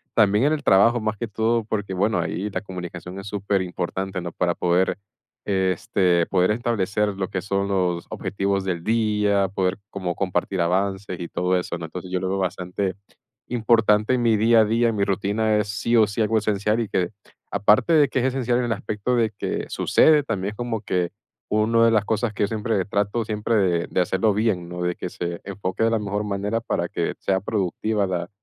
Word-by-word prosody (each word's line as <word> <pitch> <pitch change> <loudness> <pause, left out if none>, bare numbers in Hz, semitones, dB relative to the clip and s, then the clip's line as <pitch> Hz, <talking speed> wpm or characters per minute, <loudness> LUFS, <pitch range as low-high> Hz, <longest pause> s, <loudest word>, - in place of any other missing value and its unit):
también 105 +3 +4
en 155 - +3
el 150 - -3
trabajo 115 +5 +5
más 110 -1 -2
que 120 - -3
todo, 115 +2 +1
porque, 105 -3 -3
bueno, 100 +1 +1
ahí 95 +4 -2
la 95 - -3
comunicación 90 -1 -7
es 95 - -8
superimportante, 95 -1 -2
¿no?, 85 -1 -5
para 90 -1 0
poder, 90 +1 +1 0.5
este, 95 -2 +1
poder 90 +1 +2
establecer 105 -2 0
lo 95 -1 -2
que 95 - -3
son 100 -1 -1
los 90 -3 0
objetivos 100 0 -1
del 85 -3 -2
día, 105 -2 +2
poder 95 -1 -1
como 90 -5 -3
compartir 95 0 -1
avances 95 +1 -1
y 85 - -4
todo 90 +1 0
eso, 85 - -4
¿no? 85 - -6
Entonces, 90 +2 -8
yo 90 - 0
lo 95 - -1
veo 95 - -1
bastante 95 +1 -2 0.5
importante 110 -1 +3
en 120 - 0
mi 115 -2 +3
día 115 +2 +5
a 110 - +4
día, 115 +2 +2
en 115 - -2
mi 100 - +2
rutina 105 +2 +1
es 105 0 -1
sí 115 +4 0
o 110 - +6
sí 100 +3 -2
algo 110 +1 +2
esencial, 105 +1 0
y 110 - -2
que 90 -2 0 0.4
aparte 105 - +3
de 150 -3 +6
que 130 - 0
es 125 - 0
esencial 125 -2 +1
en 125 - 0
el 115 - 0
aspecto 105 +4 -2
de 115 -2 +2
que - - -3
sucede, 155 -2 +4
también 100 -5 -2
es - - -12
como 120 -3 -3
que 90 -4 -1 0.4
uno 110 +2 +3
de - - +5
las 110 -2 +2
cosas 110 +1 0
que 105 - -1
yo - - +2
siempre 110 -2 -1
trato 100 +3 -1
siempre 105 +1 -1
de 90 -5 +2
de 90 - +1
hacerlo 95 +4 +1
bien, 100 -6 0
¿no?, 90 0 -4
de 90 0 0
que 90 - -5
se 85 0 -5
enfoque 100 +1 -3
de - - +3
la 115 - +2
mejor 105 0 -2
manera 105 +3 -2
para - - -2
que - - -2
sea 95 -1 +1
productiva 105 +1 -1
la 90 -1 -3
100 Hz, 210 wpm, -23 LUFS, 95-110 Hz, 0.5 s, o